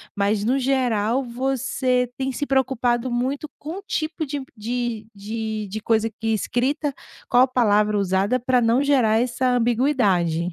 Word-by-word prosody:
mas 205 +1 +1
no 250 +5 +2
geral 250 -2 +1
você 255 0 0
tem 265 0 -1
se 290 - -3
preocupado 255 -2 +1
muito 265 +5 -1
com 320 +6 -6
o 400 - -14
tipo 315 -1 -2
de 280 -1 -4
de 230 0 -3
de 215 +1 -4
de 215 +3 -4
coisa 225 0 +1
que 225 - -3
escrita, 275 +7 -1 0.4
qual 245 +1 +6
a - - +3
palavra 210 -4 +2
usada 200 +5 +1
para 250 0 +2
não 235 +4 +3
gerar 245 -6 +3
essa 250 +1 0
ambiguidade. 230 - +2
245 Hz, 155 wpm, -23 LUFS, 220-265 Hz, 0.4 s, qual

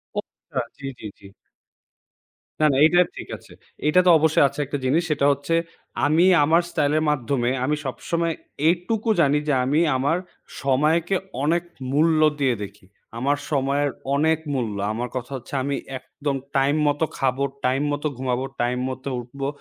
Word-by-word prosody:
ও! - - 0
আচ্ছা। - - -6
জি, 140 - -9
জি, - - -10
জি। 100 - -13 1.3
না, - - +5
না, - - +1
এইটা 175 +2 +4 0.2
ঠিক - - -8
আছে। - - -19 0.4
এইটা 150 +4 +5
তো - - +6
অবশ্যই 155 -1 +4
আছে 140 +2 -8
একটা 145 +2 -3
জিনিস 145 +6 +3
সেটা 140 -2 +1
হচ্ছে, 140 +4 -1 0.5
আমি 155 +4 +4 0.2
আমার 165 +4 +4
স্টাইলের 155 -1 +1
মাধ্যমে 130 -3 0
আমি 150 +3 +1
সবসময় 165 +5 -2 0.3
এইটুকু 195 +7 0
জানি 145 -1 +3
যে, 145 - +2
আমি 145 +4 +2 0.2
আমার 145 +6 +1 0.4
সময়কে 155 +7 +2 0.3
অনেক 165 +3 +2 0.3
মূল্য 155 +3 +3 0.2
দিয়ে 130 -3 +2
দেখি, 100 -1 -11 0.3
আমার 140 +4 +1
সময়ের 140 0 +1 0.3
অনেক 160 +2 +3 0.2
মূল্য। 115 -6 -2 0.2
আমার 120 +3 -3
কথা 130 +1 -4
হচ্ছে, 125 - -13
আমি 140 +1 -1 0.2
একদম 140 +2 -4 0.2
টাইম 135 +2 +3
মতো 145 +2 +1
খাবো, 135 0 0 0.2
টাইম 130 +2 +1
মতো 145 +1 -1
ঘুমাবো, 130 0 -1 0.2
টাইম 120 +1 0
মতো 130 +1 -5
উঠবো 135 +3 -5
140 Hz, 160 wpm, -23 LUFS, 130-155 Hz, 1.3 s, তো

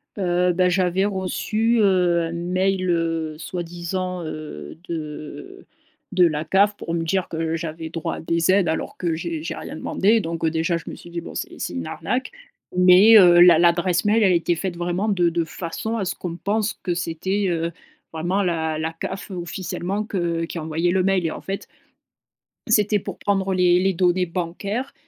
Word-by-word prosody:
Heu, 180 -2 +1
bah, 180 +1 +3
j'avais 185 +1 +1
reçu, 215 +4 0
heu, 180 -4 +3
un - - -6
mail, 185 +2 0
heu, 165 -2 -1
soi-disant, 175 +2 -4
heu, 155 0 -7
de 165 - -7 0.5
de 180 - +5
la 155 -1 0
CAF 200 +4 +3
pour 165 - -5
me 165 - 0
dire 180 +2 0
que 165 0 -2
j'avais 160 0 -6
droit 165 -1 -3
à - - -7
des 165 +1 0
aides 190 -3 +4
alors 160 - -3
que 170 -3 -1
j'ai 315 - -4
j'ai - - -4
rien - - -7
demandé 220 +4 +2
donc, 165 -2 -5
heu, - - +3
déjà, 165 +2 0
je 165 - -9
me - - -7
suis 175 - -13
dit: 170 0 -4
«Bon - - -10
c'est - - -5
c'est - - -3
une 85 -1 -4
arnaque». 255 - -3 0.5
Mais, 185 +5 +8
heu, 175 -3 +7
l'a 175 -2 +8
l'adresse 175 +1 +2
mail, 215 +2 +3
elle 190 - +5
était 170 0 +1
faite 175 +1 -4
vraiment 175 +5 -1
de 180 -4 +2
de 170 0 0
façon 180 +7 -4
à 200 - -2
ce - - -2
qu'on 170 -1 -6
pense 215 +2 -1
que 175 - -1
c'était, 185 +4 -1
heu, 165 -1 -1 0.4
vraiment 175 +5 0
la 160 -4 -1
la 160 +1 -2
CAF 185 +4 -6
officiellement 180 +3 -3
que 170 -5 -1
qui 170 - -7
envoyait 160 +2 -1
le 185 0 +2
mail. 190 -2 +1
Et 160 - 0
en - - -7
fait 195 0 -5 1.0
c'était 210 -1 +3
pour - - -7
prendre 195 -1 0
les 180 -1 +4
les 190 +1 +2
données 180 +1 +2
bancaires 185 +9 -4
175 Hz, 190 wpm, -22 LUFS, 165-195 Hz, 1.0 s, Mais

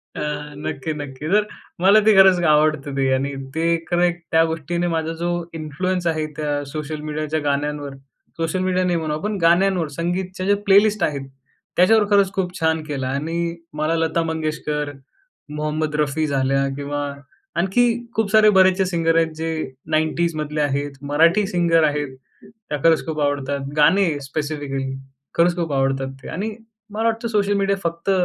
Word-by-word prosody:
अ, - - -4 0.4
नक्की-नक्की. 145 0 -5
तर 210 0 +5 0.4
मला 200 +3 +7
ते 215 -2 +6
खरंच 190 -2 +7
आवडतं 150 -2 +2
ते. 135 -1 +2
आणि 140 +2 -1 0.2
ते 165 +1 +1
एक 165 0 -4
खरं 175 0 +3
एक 175 0 +1
त्या 160 0 +5
गोष्टीने 165 +2 -2
माझा 165 -1 -1
जो 175 - 0 0.3
इन्फ्लुअन्स 170 +4 -2
आहे 160 -1 0
त्या 145 -1 -1
सोशल 155 0 -5
मीडियाच्या 155 +1 -2
गाण्यांवर, 145 0 -2 0.4
सोशल 165 +3 -1
मीडिया 185 0 +1
नाही 175 -1 +1
म्हणू 155 -2 -2
आपण 205 +7 -2
गाण्यांवर. 175 0 +3
संगीतच्या 185 +2 -3
ज्या 205 +1 +4
प्लेलिस्ट 205 0 +4
आहेत 140 -2 -1 0.5
त्याच्यावर 210 +4 +5
खरंच 200 -1 +4
खूप 185 -2 -3
छान 160 -1 +1
केला 140 -4 -4
आणि 165 +5 -2 0.2
मला 155 +2 +1
लता 165 0 0
मंगेशकर, 155 -2 -2 0.6
मोहम्मद 150 0 -2
रफी 150 +1 0
झाल्या 135 0 +1
किंवा 145 0 -3 0.5
आणखी 195 +7 +2 0.3
खूप 215 -2 0
सारे 215 -1 +6
बरेचसे 190 0 +4
सिंगर 165 -2 +1
आहेत 165 -1 +2
जे 165 +1 -3 0.4
90s 160 +1 +1
मधले 150 0 -2
आहेत, 145 0 -1
मराठी 165 +8 +3
सिंगर 170 -4 +2
आहेत, 145 -3 -2 0.5
त्या 150 - -2
खरंच 165 -1 +4
खूप 155 -1 -3
आवडतात. 140 -1 -1 0.2
गाणे 185 +6 +5 0.2
स्पेसिफिकली 145 -1 -3 0.5
खरंच 175 +1 +4
खूप 165 -4 -2
आवडतात 135 0 0
ते. - - -9
आणि 210 +4 -4 0.4
मला 220 +2 -3
वाटतं 230 +1 -2
सोशल 205 -2 +1
मीडिया 195 0 +1
फक्त 170 +3 -2
160 Hz, 160 wpm, -21 LUFS, 150-180 Hz, 0.6 s, मला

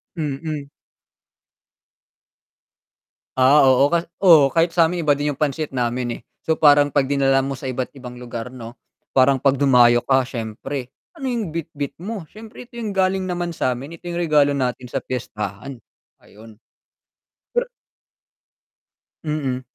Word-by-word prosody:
Mm. 150 -1 -4 2.7
Ah, 135 +3 +6
oo 130 +1 +5
ka 170 - +3 0.2
oh 155 -6 +7
kahit 165 +2 +1
sa'min 170 -1 +2
iba 145 - +5
din 145 +1 -1
yung 140 - -4
pansit 150 0 -1
namin, 125 -1 -2
eh. - - -17 0.2
So, 160 -1 0
parang 145 -1 +5
pagdinala 135 -1 +2
mo 135 - -3
sa 130 0 -6
iba't 130 0 -4
ibang 125 -3 -10
lugar 120 -1 -6
'no, 120 -2 -10 0.4
parang 135 +1 +4
pagdumayo 125 -3 +4
ka 130 -1 +2
siyempre, 125 +2 -6 0.2
"Ano 275 -6 -4
yung 220 -10 -3
bitbit 150 -4 -5
mo?" 205 -3 -5
"Siyempre 220 +3 -11
ito 235 -1 -10
yung 220 - -3
galing 185 0 +1
naman 175 -1 -3
sa'min, 130 +1 -3
ito 175 +1 -9
yung 170 - -4
regalo 150 -4 +2
natin 125 -1 -3
sa 135 - -3
piyestahan," 105 0 -5 0.4
ayun. 110 +1 -16 1.0
Pero 485 0 0 1.6
Mm. 140 -4 -2
140 Hz, 135 wpm, -21 LUFS, 130-165 Hz, 2.7 s, oh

